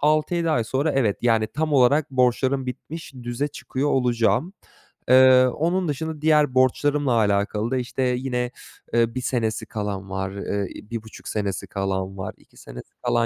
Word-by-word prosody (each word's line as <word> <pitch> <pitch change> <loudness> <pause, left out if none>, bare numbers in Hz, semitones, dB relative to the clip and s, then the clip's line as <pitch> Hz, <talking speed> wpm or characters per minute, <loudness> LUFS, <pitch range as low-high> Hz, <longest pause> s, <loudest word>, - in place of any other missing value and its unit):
6-7 155 +3 +2
ay 120 -7 +1
sonra 135 +6 0
evet, 115 -7 +1
yani, 115 -2 +3
tam 150 +8 -2
olarak 140 +3 +4
borçlarım 130 +1 +1
bitmiş 140 +4 -7
düze 120 +4 -2
çıkıyor 140 0 -3
olacağım. 125 - +1 0.6
Eee, 130 0 +7
onun 170 +7 0
dışında 155 +1 -4
diğer 150 -3 +3
borçlarımla 140 +2 +2
alakalı 105 +1 +1
da 130 - +1
işte 125 +1 -3
yine, 125 -1 -1 0.4
eee, 115 0 +2
1 130 - -2
senesi 115 -4 -1
kalan 100 -2 -4
var, 95 0 -3
eee, 100 0 -3 0.2
1,5 110 -1 -7
senesi 100 -3 -3
kalan 95 -1 -3
var, 95 - -5
2 - - -25
senesi - - -11
kalan 115 0 +2
125 Hz, 155 wpm, -23 LUFS, 110-145 Hz, 0.6 s, Eee